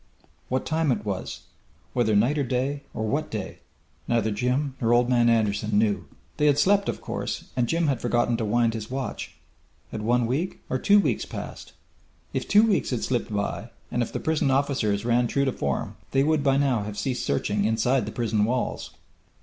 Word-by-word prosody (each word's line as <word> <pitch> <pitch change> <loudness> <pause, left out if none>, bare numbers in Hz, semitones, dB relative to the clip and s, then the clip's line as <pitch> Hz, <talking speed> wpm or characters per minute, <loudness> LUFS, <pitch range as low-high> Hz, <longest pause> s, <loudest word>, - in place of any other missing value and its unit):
What 130 +1 -1
time 160 -2 +1
it 105 -3 -1
was 100 -3 -4 0.5
whether 115 -4 +2
night 125 +9 +3
or - - +2
day 130 +3 -1
or 110 - -3
what 145 +8 -1
day, 105 -4 -5 0.5
neither 115 -2 +1
Jim 125 +6 0
nor 115 0 +3
Old 120 0 +3
Man 120 -2 +4
Anderson 105 -2 +1
knew. 105 -1 +1 0.3
They 150 - +3
had 145 -1 +4
slept, 200 +5 +3
of - - -4
course, - - -4
and 120 -1 +1
Jim 165 +4 +1
had 135 -6 0
forgotten 120 0 +1
to 115 - -2
wind 115 +2 +2
his 110 -1 -5
watch. 130 0 -5 0.6
Had 110 - -4
one 120 +2 +2
week 145 +10 -2
or 130 - +1
two 205 +7 +5
weeks - - 0
passed? - - -8 0.6
If - - -2
two 210 +1 +6
weeks 220 -4 +2
had 125 -4 -2
slipped 120 -2 -1
by 105 +2 -2 0.2
and 120 - 0
if 120 - -2
the - - -3
prison 160 -3 +1
officers 130 -7 +1
ran 120 0 +3
true 140 +3 +1
to 130 - +1
form 70 - -3 0.2
they 135 0 +4
would 155 0 +2
by 135 -1 +3
now 135 -6 +2
have 105 0 -6
ceased 130 -2 -2
searching 105 -1 0
inside 115 +3 +1
the - - -4
prison 110 -3 0
walls. 120 +3 -2
120 Hz, 200 wpm, -25 LUFS, 110-140 Hz, 0.6 s, two